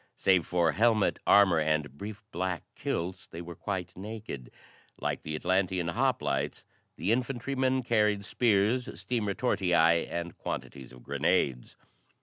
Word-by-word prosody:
Save 95 -4 +3
for 85 -2 +2
helmet, 110 +2 +2
armor 95 -5 +6
and 75 -2 0
brief 105 +6 -7
black 90 -1 -2
kilts, 90 +2 -3
they 85 - -9
were 85 0 -7
quite 95 -2 -4
naked. 100 - -7 0.5
Like - - -2
the 75 +1 -4
Atlantean 90 0 0
hoplites 70 -4 0 0.3
the 100 - -1
infantrymen 130 +1 0
carried 105 -4 +2
spears, 115 +2 +1
steam 120 -4 -1
retortii 90 -6 +2
and 85 0 -4
quantities 65 -2 -6
of 65 -1 -14
grenades. 60 -3 0
95 Hz, 130 wpm, -29 LUFS, 85-110 Hz, 0.5 s, armor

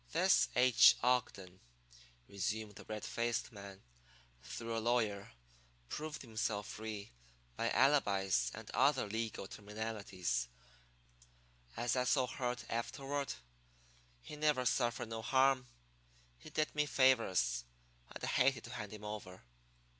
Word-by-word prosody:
"This 185 +3 +4
H. 125 -1 +7
Ogden," 100 -7 0 0.7
resumed 105 +2 -3
the - - -12
red 105 -1 -5
faced 120 0 -1
man, 100 -2 -11 0.6
"through 115 - -5
a - - 0
lawyer, 110 -4 0 0.6
proved 155 -1 -5
himself 110 -3 -2
free 105 -2 -6 0.4
by 115 - 0
alibis 100 - +3
and - - -9
other 135 -1 +3
legal 110 -2 -3
terminalities, 105 - -3 1.3
as 120 +2 0
I 125 0 +1
so 130 0 +3
heard 125 -1 -3
afterward. 140 +4 -3 0.9
He - - -8
never 150 -4 +1
suffered 120 -2 0
no 115 0 -4
harm. 130 +1 +3 0.7
He - - -11
did 155 0 -1
me 150 0 +1
favors, 115 - +3 0.5
and - - -9
I - - +1
hated 130 -2 +2
to - - -9
hand 105 -3 -6
him 105 0 -9
over." 105 -3 -7
115 Hz, 125 wpm, -35 LUFS, 105-130 Hz, 1.3 s, H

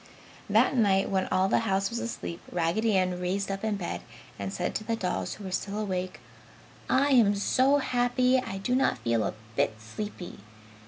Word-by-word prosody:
That - - +4
night 200 -5 +3
when 190 -1 +1
all 185 +1 +2
the - - +3
house 195 -2 0
was 235 - -2
asleep, 200 -7 -5
Raggedy 185 +6 +1
Ann 185 -1 0
raised 190 +2 -1
up 195 +1 -4
in 215 -1 0
bed 180 -4 -4 0.4
and 100 -1 -3
said - - -2
to 215 - -3
the 230 +1 -1
dolls 185 -5 -2
who 210 - -11
were 190 - -5
still 200 +2 -2
awake, 185 -3 -3 0.7
"I 280 +2 +3
am 230 -7 +5
so 260 +7 +3
happy 250 -1 +2
I 195 -6 -5
do 195 +6 -1
not 260 - +2
feel 115 -2 0
a - - -2 0.2
bit 110 - +1
sleepy. 175 - -7
200 Hz, 190 wpm, -28 LUFS, 185-230 Hz, 0.7 s, am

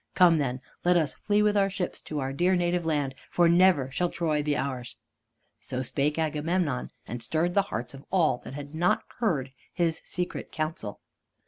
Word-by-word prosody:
Come 175 -3 +6
then, 130 -2 -1 0.2
let 180 0 +4
us 155 -5 +1
flee 210 0 +1
with 210 0 +3
our 195 -1 +3
ships 190 -2 -3
to 155 - -3
our 135 -1 -2
dear 180 +6 +3
native 175 -1 0
land, 145 -4 0 0.2
for 175 -1 +4
never 170 -6 +4
shall 175 +6 0
Troy 155 -4 0
be 145 0 0
ours." 130 -3 -3 0.6
So 130 +1 -4
spake 145 +4 0
Agamemnon, 155 -2 0 0.2
and 120 0 -6
stirred 165 +7 +1
the 200 - +5
hearts 120 - -4
of 135 0 -11
all 170 -9 +3
that 135 - -9
had 145 +1 -7
not 175 +6 +2 0.2
heard 150 - 0 0.2
his 165 -2 0
secret 180 -1 -4
council. 155 -9 -4
160 Hz, 185 wpm, -28 LUFS, 140-180 Hz, 0.6 s, Come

